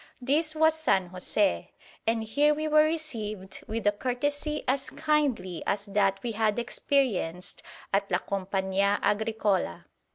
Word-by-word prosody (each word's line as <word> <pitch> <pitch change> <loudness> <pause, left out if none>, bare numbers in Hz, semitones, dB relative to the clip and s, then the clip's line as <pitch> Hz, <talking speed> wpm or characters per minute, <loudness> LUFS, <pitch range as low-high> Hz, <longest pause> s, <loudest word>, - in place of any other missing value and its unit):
This 305 +5 +1
was 315 0 +4
San 190 - +1
José, 180 - 0 0.4
and 225 0 +1
here 290 +7 +2
we 310 +1 -2
were 305 0 +5
received 220 - -4
with 220 0 -4
a 205 - +5
courtesy 290 +7 -2
as 265 +1 0
kindly 285 - 0
as 200 0 0
that 200 -1 +1
we 240 - -2
had 215 0 +1
experienced 235 - -1 0.3
at 200 0 +1
La 180 - +2
Compañía 195 +1 0
Agricola. 210 - 0
220 Hz, 135 wpm, -28 LUFS, 195-290 Hz, 0.4 s, were